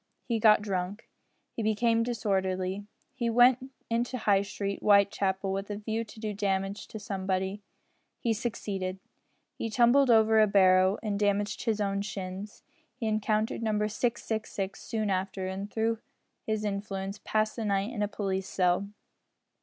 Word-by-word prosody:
He 230 -3 -1
got 210 -1 +6
drunk. 195 +1 -3 0.5
He - - -2
became 225 +1 +2
disorderly. 195 -4 -1 0.3
He 240 -3 -1
went 250 +3 +4 0.2
into 240 +2 -1
High 200 -4 +3
Street, 200 0 -4
Whitechapel, 200 -1 +3
with 195 +1 -3
a 205 - -2
view 220 +2 -2
to 220 0 -13
do 215 -1 -3
damage 195 0 -2
to - - -8
somebody. 190 -1 -2 0.6
He 230 - +1
succeeded. 200 -4 -3 0.6
He 225 - -2
tumbled 245 +4 +4
over 220 -1 +5
a 215 - +5
barrow, 190 -1 +5
and 205 -2 -1
damaged 205 +1 0
his 220 -3 +1
own 200 -1 0
shins. 195 0 -6 0.3
He 235 - -5
encountered 215 +1 0
Number 210 -2 +1
666 220 -3 -2
soon 215 -3 -2
after, 190 0 -2
and, 190 +2 -4
through 225 0 0 0.5
his 215 -1 -1
influence, 195 -1 -3
passed 215 0 0
the 230 - -3
night 200 +3 0
in 210 - -3
a 205 - +2
police 195 -2 -3
cell. 180 +1 +1
205 Hz, 150 wpm, -29 LUFS, 195-220 Hz, 0.6 s, got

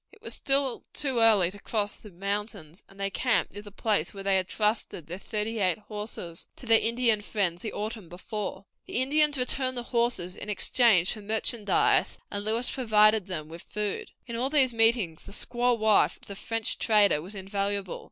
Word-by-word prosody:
It 425 +1 -21
was - - -4
still 275 -2 +1
too 265 -5 +1
early 210 -6 +4
to 205 - -12
cross 210 -1 -1
the 210 - -13
mountains, 200 -3 -5
and 195 - -18
they 195 0 -1
camped 245 +3 +1
near 205 - -7
the 205 0 -12
place 200 -4 -1
where 195 - -7
they 195 0 +2
had 185 -1 0
trusted 210 -6 -1
their 175 +4 -7
thirty 215 +2 -3
eight 185 -3 +2
horses 210 -5 -7
to - - -12
their 225 -1 +5
Indian 230 -2 +2
friends 190 -5 -1
the 220 - -4
autumn 215 -4 -5
before. 195 +2 -6 0.2
The - - -8
Indians 295 +2 +3
returned 255 0 0
the 240 - -2
horses 235 -7 -1
in 210 - -8
exchange 205 -2 +3
for 215 - -9
merchandise, 215 0 +1
and 205 0 -3
Lewis 225 +3 +1
provided 215 -5 +3
them 155 -5 -5
with 165 +2 -10
food. 210 -1 -4 0.2
In 235 - -6
all 250 +3 -1
these 270 -4 +3
meetings 225 -8 +2
the - - -13
squaw 245 +2 +1
wife 220 -1 +3
of - - -18
the 200 - -8
French 225 +2 -1
trader 205 -8 +4
was 190 +6 -8
invaluable. 195 0 -3
210 Hz, 190 wpm, -27 LUFS, 195-235 Hz, 0.2 s, their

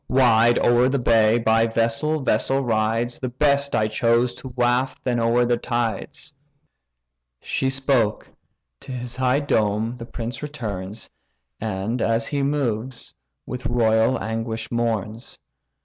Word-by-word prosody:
Wide 120 -2 +4
o'er 120 +1 +4
the 140 - +1
bay, 115 -2 +3
by 115 0 +2
vessel 115 +7 0
vessel 135 +3 +1
rides; 115 +1 0
The 130 - -3
best 140 +2 +1
I 110 -1 +2
choose 115 +3 +1
to - - -10
waft 125 +1 0
then 120 -2 0
o'er 115 +1 +2
the 120 0 +1
tides." 120 +5 -3 1.1
She 135 - -1
spoke: 135 -5 0 0.5
to 135 - -10
his 125 -1 -5
high 130 +2 +2
dome 110 -3 0
the 115 -1 -9
prince 120 0 -6
returns, 110 -8 -6 0.5
And, 110 +3 -3
as 115 0 +1
he 140 +4 -2
moves, 130 -4 -2 0.3
with 125 0 -5
royal 115 +1 +2
anguish 115 0 -4
mourns. 115 -1 -3
120 Hz, 135 wpm, -22 LUFS, 110-130 Hz, 1.1 s, Wide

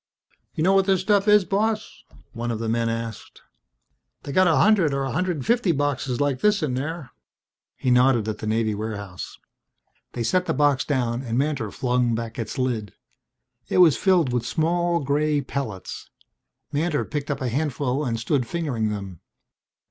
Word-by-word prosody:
"You 155 - -1
know 190 +3 +4
what 195 0 +3
this 190 -2 +3
stuff 200 +1 +2
is, 210 -2 +6
boss?" 215 +3 -2 0.3
one 120 0 -4
of 115 - -1
the 115 +1 -4
men 115 +1 0
asked. 115 -2 -6 0.8
"They 140 - -6
got 185 +5 +4
a 165 - +4
hundred 175 -3 +4
or 140 - -1
a 135 - -2
hundred 170 -1 -1
fifty 235 -6 +2
boxes 140 -4 -1
like 145 -3 0
this 210 -4 +3
in 140 -5 -1
there." 145 +1 -4 0.7
He 130 - 0
nodded 125 -3 +4
at 110 -1 -3
the 110 - -5
Navy 110 0 +1
warehouse. 100 -3 -6 0.8
They 120 - -3
set 180 +10 +1
the 160 - 0
box 145 -2 +3
down 125 -4 -1
and 120 -3 -3
Mantor 135 -5 0
flung 125 0 0
back 115 +2 -5
its 110 -2 -4
lid. 120 -5 -2 0.8
It - - 0
was 175 -6 +7
filled 175 -10 +2
with 125 -2 0
small 170 +7 0
grey 145 +2 +1
pellets. 130 -8 -5 0.6
Mantor 155 +1 0
picked 145 -1 -4
up 145 - -2
a 130 - -1
handful 140 0 -1
and 115 -4 -2
stood 125 +1 0
fingering 140 -11 -1
them. 100 -5 -6
135 Hz, 175 wpm, -24 LUFS, 115-165 Hz, 0.8 s, was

